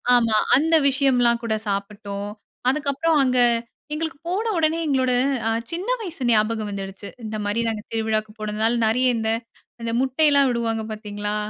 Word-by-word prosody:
ஆமா. 230 -2 +3 0.2
அந்த 320 +4 +3
விஷயம்லாம் 250 -4 +2
கூட 230 -1 0
சாப்பிட்டோம். 200 0 -4 0.4
அதுக்கப்புறம் 295 +3 +1
அங்க 255 -1 +2 0.5
எங்களுக்கு 320 0 -3
போன 410 +6 -1
உடனே 320 0 +2
எங்களோட 260 -3 +1 0.4
அ - - +2 0.2
சின்ன 350 +5 -3
வயசு 340 -10 -5
ஞாபகம் 215 -1 +1
வந்துடுச்சு. 195 0 -6 0.2
இந்த 215 0 -5
மாரி 205 +3 0
நாங்க 220 -2 -2
திருவிழாவுக்கு 220 -1 -1
போனதுனால 215 +2 0
நிறைய 250 +4 +2
இந்த, 220 0 -1 0.5
இந்த 230 0 -2
முட்டையிலாம் 280 +1 +4
விடுவாங்க 230 -2 -1
பார்த்தீங்களா! 210 -1 -4
230 Hz, 140 wpm, -23 LUFS, 215-280 Hz, 0.5 s, முட்டையிலாம்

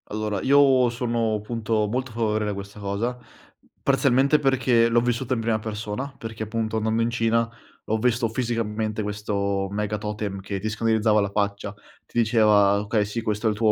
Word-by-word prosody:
Allora, 105 0 -2
io 135 -3 +5
sono 115 -2 -1
punto 110 -1 -1
molto 125 +3 -3
favorevole 110 -2 0
a - - -3
questa 100 +1 -8
cosa, 105 +5 -2 0.6
parzialmente 140 +1 +3
perché, 125 -4 +3
l'ho 120 0 +4
vissuta 120 +1 -1
in - - -2
prima 110 -1 0
persona, 110 +5 -5
perché 110 -1 -6
punto 110 0 -2
andando 110 +1 0
in 115 - +1
Cina, 115 0 +1 0.4
ho 110 - 0
visto 120 +1 +1
fisicamente 110 -2 -2
questo 100 -1 -2
mega 105 +1 -2
totem 105 -2 -4
che 100 0 -4
ti 110 - -3
scannerizzava 110 0 +2
la 100 - -1
faccia, 100 0 -2 0.3
ti - - -9
diceva: 105 -3 +4
"Okay, 105 0 0
sì 105 +3 -4
questo 105 0 -1
è - - +4
il - - -3
tuo 110 0 +3
110 Hz, 175 wpm, -24 LUFS, 105-115 Hz, 0.6 s, io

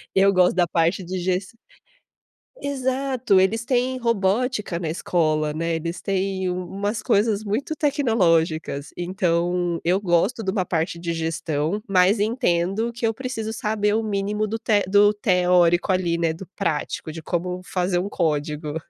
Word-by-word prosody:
eu 195 +1 +5
gosto 180 -1 +4
da 175 -2 +3
parte 170 +3 +1
de 185 +2 -4
ges 185 +2 -1 1.2
exato, 260 -5 +1
eles 225 +5 +1
têm 255 0 0
robótica 225 -3 0
na 170 -2 -4
escola, 155 -2 0
né? 165 +2 -2
Eles 165 +2 -4
têm 190 -1 -1
umas 200 +4 -3
coisas 210 0 +1
muito 225 +9 -2
tecnológicas. 170 - +1
Então, 175 -1 0
eu 180 +3 +2
gosto 200 +5 +1
de 190 - 0
uma 190 -3 0
parte 170 0 -2
de 170 0 -3
gestão, 160 +3 -2
mas 190 +2 +4
entendo 210 0 0
que 235 -1 -1
eu 225 - -1
preciso 235 -4 -4
saber 210 -1 0
o 225 - 0
mínimo 210 0 -1
do 225 +2 -3
te 210 -2 +2
do 205 +1 +5
teórico, 180 -2 +3
ali, 175 -2 +1 0.2
do 185 +2 -10
prático, 160 -3 -2
de 160 0 -9
como 180 +2 -2
fazer 180 -1 -1
um 195 +3 -3
código. 150 -3 -2
190 Hz, 150 wpm, -23 LUFS, 170-215 Hz, 1.2 s, eu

